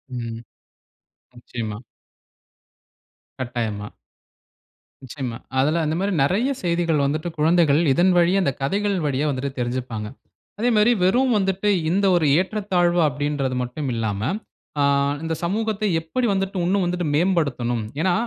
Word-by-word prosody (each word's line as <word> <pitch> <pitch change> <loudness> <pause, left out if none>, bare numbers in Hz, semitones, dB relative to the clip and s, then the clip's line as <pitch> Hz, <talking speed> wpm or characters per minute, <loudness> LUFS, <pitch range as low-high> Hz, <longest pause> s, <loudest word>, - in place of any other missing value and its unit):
ம். 115 -2 -5 1.0
நிச்சயமா. 115 -3 -6 1.6
கட்டாயமா. 115 -5 -3 1.2
நிச்சயமா. 125 -3 -5 0.2
அதில 155 +5 +2
அந்த 155 - 0
மாரி 200 +1 0
நெறையா 230 - +1
செய்திகள் 170 -4 +1
வந்துட்டு, 155 +4 -1
குழந்தைகள் 160 -1 +4
இதன் 180 +4 +3
வழியா, 175 +3 +4
அந்த 140 - +1
கதைகள் 200 +8 0
வழியா 140 +1 0
வந்துட்டு 140 0 -2
தெரிஞ்சுப்பாங்க. 120 -3 -3 0.5
அதே 240 +3 +2
மாரி 215 +3 +5
வெறும் 245 +7 +3
வந்துட்டு, 195 +1 0 0.2
இந்த 195 +4 +2
ஒரு 170 -3 +2
ஏற்றத்தாழ்வு 185 -3 +1
அப்படின்றது 145 -2 -2
மட்டும் 130 +3 -4
இல்லாம, 105 -3 -2 0.6
ஆ - - +4 0.4
இந்த 165 - -2
சமூகத்தை 215 +3 -1
எப்படி 240 +10 -2
வந்துட்டு 195 0 -2
உன்னும் 190 +2 +2
வந்துட்டு 175 -1 -1
மேம்படுத்தணும்? 140 - 0 0.2
ஏன்னா, 180 +1 +2
160 Hz, 120 wpm, -22 LUFS, 130-190 Hz, 1.6 s, மாரி